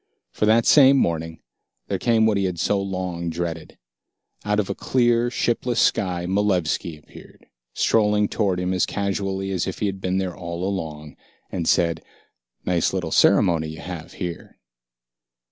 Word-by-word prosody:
For 105 Hz, -, -1 dB
that 115 Hz, +1 st, +4 dB
same 140 Hz, -2 st, +7 dB
morning, 80 Hz, -6 st, -1 dB, 0.4 s
there -, -, -2 dB
came 115 Hz, -2 st, +3 dB
what 110 Hz, -1 st, +3 dB
he 100 Hz, -1 st, +1 dB
had 90 Hz, -2 st, -3 dB
so 100 Hz, +2 st, +1 dB
long 90 Hz, -3 st, -3 dB
dreaded. 85 Hz, -1 st, -5 dB, 0.7 s
Out 105 Hz, 0 st, 0 dB
of 100 Hz, -, 0 dB
a -, -, -2 dB
clear, 120 Hz, -1 st, +1 dB
shipless 120 Hz, 0 st, -1 dB
sky, 90 Hz, -2 st, +1 dB
Malevski 90 Hz, -4 st, 0 dB
appeared, 75 Hz, -, -16 dB, 0.3 s
strolling 105 Hz, -2 st, +2 dB
toward 100 Hz, -5 st, 0 dB
him 90 Hz, +1 st, -1 dB
as 90 Hz, -, +1 dB
casually 95 Hz, -1 st, -2 dB
as 90 Hz, -3 st, -1 dB
if 95 Hz, -, -4 dB
he -, -, -2 dB
had 95 Hz, -1 st, -3 dB
been 95 Hz, 0 st, -1 dB
there 95 Hz, -2 st, -2 dB
all 85 Hz, 0 st, -6 dB
along, 75 Hz, -6 st, -5 dB, 0.3 s
and 85 Hz, -3 st, -3 dB
said, 85 Hz, -1 st, +2 dB, 0.6 s
"Nice 90 Hz, -1 st, +1 dB
little 90 Hz, -4 st, -3 dB
ceremony 80 Hz, -1 st, +4 dB
you 80 Hz, 0 st, -8 dB
have 85 Hz, -2 st, -8 dB
here." 85 Hz, -3 st, -7 dB
95 Hz, 160 wpm, -23 LUFS, 85-105 Hz, 0.7 s, same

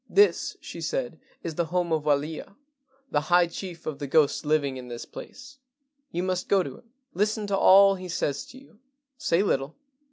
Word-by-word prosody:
"This," 410 Hz, +1 st, +3 dB
she -, -, -9 dB
said, -, -, -3 dB, 0.2 s
"is 165 Hz, -, -3 dB
the 170 Hz, +2 st, 0 dB
home 175 Hz, 0 st, 0 dB
of 155 Hz, -2 st, 0 dB
Walia, 150 Hz, +5 st, -1 dB, 0.6 s
the 145 Hz, -, +2 dB
high 175 Hz, +3 st, +4 dB
chief 170 Hz, 0 st, -8 dB
of 150 Hz, -3 st, -4 dB
the 145 Hz, -, -4 dB
ghosts 150 Hz, +1 st, +3 dB
living 145 Hz, -3 st, +1 dB
in 125 Hz, -1 st, -8 dB
this 120 Hz, -1 st, -7 dB
place. 280 Hz, 0 st, -11 dB, 0.5 s
You 175 Hz, -, -2 dB
must 185 Hz, -1 st, -2 dB
go 195 Hz, -2 st, +4 dB
to 135 Hz, -5 st, -8 dB
him. 230 Hz, -, -25 dB, 0.2 s
Listen 210 Hz, +3 st, 0 dB
to 200 Hz, -1 st, 0 dB
all 195 Hz, +1 st, +7 dB
he 185 Hz, -1 st, -7 dB
says 145 Hz, -4 st, -1 dB
to 260 Hz, -, -13 dB
you. 265 Hz, -5 st, -18 dB, 0.4 s
Say 170 Hz, +4 st, +2 dB
little. 140 Hz, -6 st, -1 dB
170 Hz, 190 wpm, -26 LUFS, 150-195 Hz, 0.6 s, all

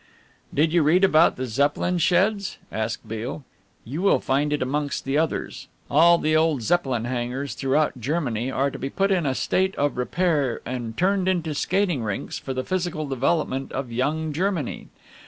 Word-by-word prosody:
"Did 155 Hz, +3 st, +2 dB
you 175 Hz, -, +4 dB
read 165 Hz, +6 st, +3 dB
about 165 Hz, -3 st, +5 dB
the 130 Hz, -, -3 dB
Zeppelin 145 Hz, +8 st, 0 dB
sheds?" 190 Hz, +4 st, +1 dB
asked 110 Hz, 0 st, -3 dB
Beale. 115 Hz, +6 st, -5 dB, 0.4 s
"You 145 Hz, +9 st, -4 dB
will 200 Hz, -, +4 dB
find 145 Hz, +3 st, 0 dB
it 150 Hz, -3 st, 0 dB
amongst 145 Hz, +2 st, -2 dB
the 135 Hz, +1 st, -1 dB
others. 160 Hz, +1 st, -1 dB, 0.2 s
All 170 Hz, +4 st, +6 dB
the 155 Hz, -1 st, +1 dB
old 155 Hz, -5 st, +2 dB
Zepp. 175 Hz, +9 st, +2 dB
hangars 125 Hz, +2 st, -2 dB
throughout 140 Hz, 0 st, 0 dB
Germany 125 Hz, -4 st, -1 dB
are 135 Hz, +1 st, 0 dB
to -, -, -8 dB
be 135 Hz, -, -3 dB
put 195 Hz, +6 st, 0 dB
in 175 Hz, -6 st, +1 dB
a 130 Hz, -, 0 dB
state 190 Hz, +7 st, 0 dB
of 145 Hz, -2 st, 0 dB
repair 145 Hz, -2 st, 0 dB
and 120 Hz, -2 st, -5 dB
turned 190 Hz, 0 st, +2 dB
into 170 Hz, -4 st, 0 dB
skating 180 Hz, -1 st, 0 dB
rinks 105 Hz, -3 st, -4 dB
for 130 Hz, -, -5 dB
the 130 Hz, -, -1 dB
physical 175 Hz, -2 st, -2 dB
development 135 Hz, 0 st, -1 dB
of 130 Hz, -3 st, -4 dB
young 150 Hz, +6 st, -1 dB
Germany. 175 Hz, -4 st, -2 dB
150 Hz, 175 wpm, -24 LUFS, 130-170 Hz, 0.4 s, All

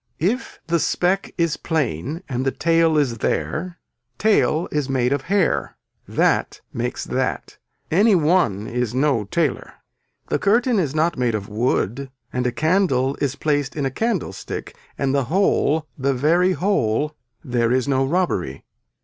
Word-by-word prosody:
If 215 Hz, -, -2 dB
the 170 Hz, 0 st, +1 dB
speck 185 Hz, +5 st, 0 dB
is 170 Hz, -3 st, +1 dB
plain 150 Hz, -, -2 dB
and 125 Hz, -2 st, -2 dB
the 135 Hz, -, +2 dB
tail 165 Hz, 0 st, +2 dB
is 125 Hz, -6 st, +1 dB
there 170 Hz, +9 st, -2 dB, 0.4 s
tail 195 Hz, -6 st, +2 dB
is 145 Hz, -3 st, -1 dB
made 130 Hz, -1 st, +1 dB
of 140 Hz, -, -1 dB
hair. 200 Hz, -3 st, +1 dB, 0.3 s
That -, -, +1 dB
makes -, -, -3 dB
that. -, -, -3 dB, 0.3 s
Any 200 Hz, +5 st, +5 dB
one 150 Hz, -, +2 dB
is 125 Hz, 0 st, -2 dB
no 130 Hz, -5 st, +2 dB
tailor. 150 Hz, -, -1 dB, 0.5 s
The -, -, +1 dB
curtain 235 Hz, +2 st, +3 dB
is 150 Hz, -5 st, -1 dB
not 165 Hz, 0 st, +1 dB
made 120 Hz, -3 st, +1 dB
of 100 Hz, -2 st, -5 dB
wood 120 Hz, +3 st, -1 dB, 0.2 s
and 125 Hz, 0 st, 0 dB
a -, -, 0 dB
candle 155 Hz, -5 st, +1 dB
is 140 Hz, -1 st, 0 dB
placed 145 Hz, -2 st, -1 dB
in 145 Hz, -3 st, -1 dB
a 135 Hz, -, -1 dB
candlestick 190 Hz, -, -3 dB, 0.2 s
and 135 Hz, -1 st, 0 dB
the 140 Hz, -2 st, +1 dB
whole, 160 Hz, -2 st, +2 dB
the 135 Hz, -1 st, 0 dB
very 170 Hz, +8 st, +3 dB
whole, 150 Hz, -, 0 dB, 0.3 s
there 120 Hz, -4 st, 0 dB
is 130 Hz, +1 st, +1 dB
no 135 Hz, -1 st, +2 dB
robbery. 135 Hz, -, -1 dB
145 Hz, 150 wpm, -22 LUFS, 125-170 Hz, 0.5 s, Any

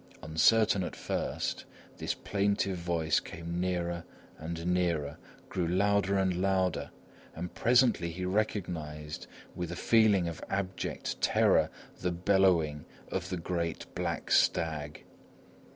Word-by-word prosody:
Uncertain 100 Hz, +7 st, +4 dB
at -, -, -5 dB
first, -, -, -3 dB, 0.3 s
this -, -, -2 dB
plaintive 100 Hz, -2 st, 0 dB
voice 85 Hz, -2 st, +1 dB
came 85 Hz, +1 st, -6 dB
nearer 85 Hz, -2 st, -1 dB, 0.4 s
and 85 Hz, +1 st, -5 dB
nearer, 85 Hz, -5 st, 0 dB, 0.3 s
grew 90 Hz, -3 st, -1 dB
louder 100 Hz, +2 st, +2 dB
and 95 Hz, -2 st, +2 dB
louder 95 Hz, -3 st, +1 dB, 0.5 s
and 85 Hz, +2 st, -5 dB
presently 120 Hz, -8 st, +3 dB
he 90 Hz, +2 st, -4 dB
recognised, 85 Hz, -7 st, -2 dB, 0.3 s
with 85 Hz, -1 st, -4 dB
a -, -, -4 dB
feeling 105 Hz, -4 st, +4 dB
of 85 Hz, -, -6 dB
abject 95 Hz, -1 st, -3 dB
terror, -, -, +4 dB, 0.3 s
the 90 Hz, -, 0 dB
bellowing 85 Hz, -5 st, +2 dB, 0.3 s
of -, -, -2 dB
the 90 Hz, -, -2 dB
great 85 Hz, -1 st, -2 dB
black -, -, -3 dB
stag. 75 Hz, -3 st, +1 dB
90 Hz, 120 wpm, -31 LUFS, 85-95 Hz, 0.5 s, Uncertain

